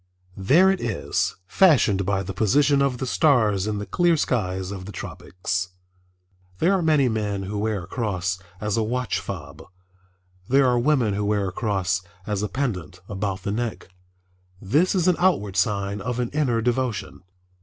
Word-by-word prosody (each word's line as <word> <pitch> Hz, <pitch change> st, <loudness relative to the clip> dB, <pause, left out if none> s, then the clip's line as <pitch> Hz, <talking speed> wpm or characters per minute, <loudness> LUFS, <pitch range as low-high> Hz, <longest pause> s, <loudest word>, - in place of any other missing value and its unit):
There 160 Hz, -, +5 dB
it 195 Hz, -, -2 dB
is, 115 Hz, -4 st, -1 dB
fashioned 105 Hz, -, +3 dB
by 95 Hz, -1 st, 0 dB
the 95 Hz, -, -5 dB
position 140 Hz, +8 st, +3 dB
of 135 Hz, -3 st, +1 dB
the 130 Hz, -, -3 dB
stars 110 Hz, -, +2 dB
in 105 Hz, -1 st, -1 dB
the 105 Hz, -, -4 dB
clear 175 Hz, +4 st, +2 dB
skies 95 Hz, -8 st, -1 dB
of 95 Hz, -2 st, -7 dB
the 105 Hz, -, -7 dB
tropics. 90 Hz, 0 st, -4 dB, 0.9 s
There 180 Hz, +4 st, +3 dB
are 190 Hz, -, +2 dB
many 155 Hz, -5 st, +3 dB
men 105 Hz, -4 st, -2 dB
who 100 Hz, +2 st, -4 dB
wear 105 Hz, -3 st, -1 dB
a -, -, -11 dB
cross 95 Hz, -6 st, -2 dB, 0.2 s
as 105 Hz, 0 st, -1 dB
a -, -, +2 dB
watch 125 Hz, +2 st, -1 dB
fob. 80 Hz, -5 st, -7 dB, 0.9 s
There 135 Hz, +1 st, +5 dB
are 125 Hz, -1 st, +3 dB
women 125 Hz, -5 st, +2 dB
who 105 Hz, +1 st, -1 dB
wear 100 Hz, -2 st, 0 dB
a -, -, -8 dB
cross 95 Hz, -4 st, -1 dB, 0.2 s
as 105 Hz, -2 st, -2 dB
a 105 Hz, -, -2 dB
pendant 95 Hz, -, -3 dB
about 95 Hz, -1 st, -3 dB
the 100 Hz, -, -2 dB
neck. 115 Hz, -2 st, -3 dB, 0.7 s
This 150 Hz, -, +2 dB
is 180 Hz, -1 st, +2 dB
an 180 Hz, -, +3 dB
outward 140 Hz, -, +1 dB
sign 100 Hz, +1 st, 0 dB
of 125 Hz, +3 st, -3 dB
an 120 Hz, -1 st, -1 dB
inner 130 Hz, -6 st, +1 dB
devotion. 120 Hz, -5 st, -2 dB
105 Hz, 175 wpm, -24 LUFS, 95-130 Hz, 0.9 s, There